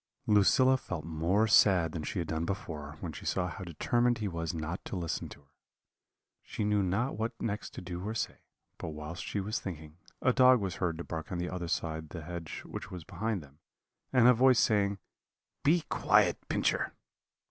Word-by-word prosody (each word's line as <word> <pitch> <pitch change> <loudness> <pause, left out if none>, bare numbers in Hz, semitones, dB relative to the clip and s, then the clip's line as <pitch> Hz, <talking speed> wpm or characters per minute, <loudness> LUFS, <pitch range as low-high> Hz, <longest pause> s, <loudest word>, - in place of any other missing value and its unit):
"Lucilla 130 +6 +5
felt 90 -10 -6
more 85 +7 +1
sad 95 -6 +5
than 80 - -4
she 75 - -4
had 85 -3 -1
done 80 +1 -1
before, 80 -5 -5
when 85 - -4
she - - -9
saw 90 -1 0
how 90 +3 -6
determined 120 +8 +1
he 110 -2 -2
was 85 -2 -3
not 80 +1 -4
to - - -5
listen 85 -3 -3
to - - -12
her. 70 - -31 0.9
She - - -4
knew 105 0 +2
not 100 +8 0
what 115 +2 -2
next 105 -1 -3
to - - -6
do 90 -1 -6
or 110 +2 -3
say; - - -3 0.4
but - - -5
whilst 75 +3 -6
she 105 - -3
was 105 +4 -2
thinking, 80 -4 -7 0.2
a 130 - +3
dog 130 -1 +6
was 95 -3 -3
heard 85 -4 -1
to 85 - -5
bark 80 +4 -6
on 90 - -2
the 90 0 -2
other 90 -2 -4
side 80 -1 -2
the 80 0 -7
hedge 85 -1 -6
which 95 - -7
was 90 -4 -7
behind 100 0 -3
them, 70 +1 -19 0.5
and 125 -2 +6
a 125 - +8
voice 125 +1 +5
saying, 100 -2 +2 0.7
'Be 165 +5 +4
quiet, - - +3
Pincher.' - - +1
90 Hz, 200 wpm, -31 LUFS, 80-110 Hz, 0.9 s, a